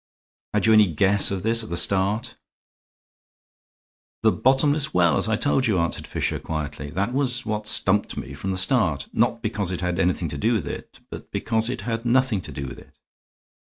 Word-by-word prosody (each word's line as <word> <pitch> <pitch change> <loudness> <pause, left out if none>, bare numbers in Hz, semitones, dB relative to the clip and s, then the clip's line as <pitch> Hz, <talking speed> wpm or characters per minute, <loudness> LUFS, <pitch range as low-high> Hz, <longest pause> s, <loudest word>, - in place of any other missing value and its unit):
Had - - +2
you 110 - +5
any 105 -2 +6
guess 100 +5 +3
of 95 -2 -3
this 115 +1 +4
at - - -8
the 85 - -1
start?" 100 +5 0 1.9
"The - - +5
bottomless 145 +2 +2
well, 85 -2 +4
as - - 0
I 110 - +2
told 135 +2 +1
you," 105 -4 +1
answered 85 -1 -2
Fisher, - - -2
quietly; 75 -2 -5
"that 100 +9 -2
was 130 -3 0
what 105 -1 -3
stumped 105 -1 +2
me - - -6
from 85 +7 -5
the 95 - -1
start. 90 - +1
Not - - 0
because 100 -3 -2
it 90 - -4
had 90 -1 -2
anything 90 -1 0
to 75 - -5
do 115 +8 +1
with 105 -10 -1
it, - - -8 0.3
because 115 0 0
it 125 -1 -4
had 115 -1 -3
nothing 125 -4 +2
to 75 - -9
do 70 0 -5
with 65 0 -8
it." - - -19
105 Hz, 195 wpm, -23 LUFS, 85-115 Hz, 1.9 s, any